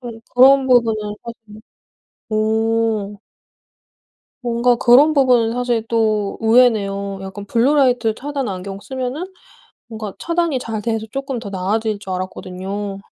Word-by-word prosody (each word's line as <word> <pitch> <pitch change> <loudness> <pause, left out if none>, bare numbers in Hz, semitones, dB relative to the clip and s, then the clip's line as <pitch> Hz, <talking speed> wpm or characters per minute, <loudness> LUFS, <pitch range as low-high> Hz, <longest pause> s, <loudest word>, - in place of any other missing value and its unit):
그럼 235 -3 -9
그런 265 +2 +6
부분은 225 -4 +2
사실 225 -2 -11 0.7
오. 220 -1 0 1.2
뭔가 240 0 +2
그런 265 +7 +5
부분은 250 -5 +3
사실 240 -2 -1
또 215 -3 0
의외네요. 210 -4 +2
약간 195 +1 -8
블루라이트 245 -1 +2
차단 280 0 -4
안경 195 +1 -6
쓰면은 265 - -5 0.6
뭔가 215 -3 -7
차단이 335 -5 -1
잘 225 -3 -5
돼서 225 0 -2
쪼끔 270 -2 -4
더 215 -3 -7
나아질 205 +3 -2
줄 190 -2 -8
알았거든요. 190 +2 -5
225 Hz, 265 characters per minute, -19 LUFS, 205-250 Hz, 1.2 s, 그런